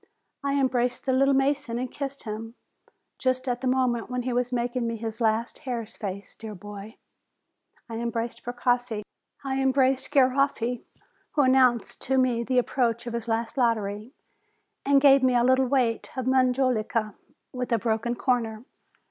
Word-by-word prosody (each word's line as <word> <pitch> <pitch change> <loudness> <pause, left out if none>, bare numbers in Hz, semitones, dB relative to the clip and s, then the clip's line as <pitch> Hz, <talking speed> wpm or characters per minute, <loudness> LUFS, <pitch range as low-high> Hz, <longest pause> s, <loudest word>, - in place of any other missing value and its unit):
I 280 0 0
embraced 250 -2 0
the 260 - +1
"little 275 +1 +4
mason/' 270 -3 0
and 255 0 -4
kissed 275 -1 -5
him, 225 +1 -6 0.6
just 255 0 0
at 245 -1 -1
the 260 - -1
moment 250 -2 +1
when 250 0 -2
he 250 0 -2
was 245 0 0
mak 245 0 -1
ing 245 -2 0
me 230 - -2
his 225 +1 -5
last 225 +1 0
hare's 235 -6 -5
face, 200 -1 -6
dear 220 -2 -8
boy! 205 +3 -10 0.9
I 225 -1 -5
embraced 235 0 -3
Precossi. 245 -2 -1 0.4
I 270 0 -1
embraced 265 0 +2
Garoffi, 260 -3 +2 0.5
who 290 - +3
announced 255 -3 +3
to 265 +1 0
me 250 -2 +2
the 255 +2 -1
approach 240 -2 +1
of 240 - -5
his 235 -1 -4
last 230 +3 -1
lottery, 215 -1 0 0.7
and 280 0 +4
gave 275 -1 +6
me 255 -1 +3
a 240 - +4
little 260 +1 +4
weight 245 -4 +1
of 260 - -2
majolica, 250 -4 +1 0.4
with 250 -1 -4
a 230 - +4
broken 230 +1 -1
corner. 235 -3 -1
245 Hz, 165 wpm, -26 LUFS, 230-260 Hz, 0.9 s, gave